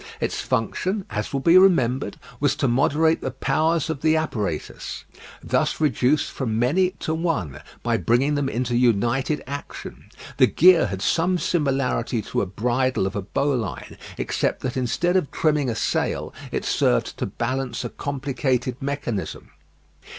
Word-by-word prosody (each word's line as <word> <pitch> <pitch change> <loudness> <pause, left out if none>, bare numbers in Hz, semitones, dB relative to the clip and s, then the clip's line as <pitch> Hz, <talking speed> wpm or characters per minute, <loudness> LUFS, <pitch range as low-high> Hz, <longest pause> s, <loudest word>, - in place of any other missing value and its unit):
Its - - -2
function, 185 - -1
as 105 0 -3
will 140 - -1
be 170 +5 +7
remembered, 135 -9 +3 0.2
was 145 -2 +2
to 140 - 0
moderate 150 +6 +2
the - - -2
powers 155 +5 0
of 160 -4 -4
the 160 0 +3
apparatus, 105 - -3 0.4
thus - - 0
reduced 145 -1 +2
from 115 -5 -2
many 155 +11 +3
to 160 - -2
one, 160 - -2 0.2
by 115 -1 +1
bringing 120 - +2
them 145 -2 0
into 120 -1 -1
united 120 +5 +1
action. 140 +2 -7 0.3
The - - +6
gear 175 -3 +5
had 95 0 -4
some 180 +2 +2
similarity 135 -8 0
to - - -1
a 100 - -2
bridle 125 +4 0
of 95 - -3
a 100 - -1
bowline, 120 +1 -2 0.2
except - - -1
that 130 - -3
instead 130 +8 0
of 180 -7 +2
trimming 150 -4 +1
a 115 - -2
sail - - -1 0.2
it - - -2
served - - +1
to - - -1
balance 125 0 -3
a - - -3
complicated 130 -3 -2
mechanism. 135 -7 -4
135 Hz, 150 wpm, -23 LUFS, 120-155 Hz, 0.4 s, be